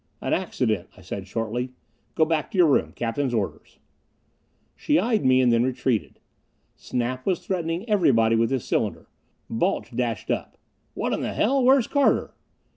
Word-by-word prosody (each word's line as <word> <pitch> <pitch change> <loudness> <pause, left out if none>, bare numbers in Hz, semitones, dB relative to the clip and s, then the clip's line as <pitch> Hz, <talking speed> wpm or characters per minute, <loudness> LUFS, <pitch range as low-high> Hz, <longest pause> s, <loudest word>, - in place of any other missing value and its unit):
"An - - -2
accident," - - -1
I - - -14
said 100 -1 -6
shortly. 115 +4 -3 0.4
"Go 160 - +4
back 155 -1 -1
to 205 - -6
your 180 - +7
room. 145 - +2
Captain's 120 +2 -1
orders." 105 -3 -4 1.0
She 300 -1 +1
eyed 225 -5 +1
me 130 0 +4
and 125 -2 +4
then 115 - +3
retreated. 130 -2 -1 0.6
Snap 125 +1 -3
was 185 -2 -1
threatening 175 +2 -2
everybody 125 - +3
with 115 0 +2
his 130 -3 -2
cylinder. - - -2 0.4
Balch 115 +1 -1
dashed 115 -5 -2
up. - - -3 0.4
"What - - -1
in - - -1
the - - -3
hell? 265 +4 +2
Where's 260 -1 +5
Carter?" 285 +2 +1
130 Hz, 160 wpm, -24 LUFS, 115-185 Hz, 1.0 s, your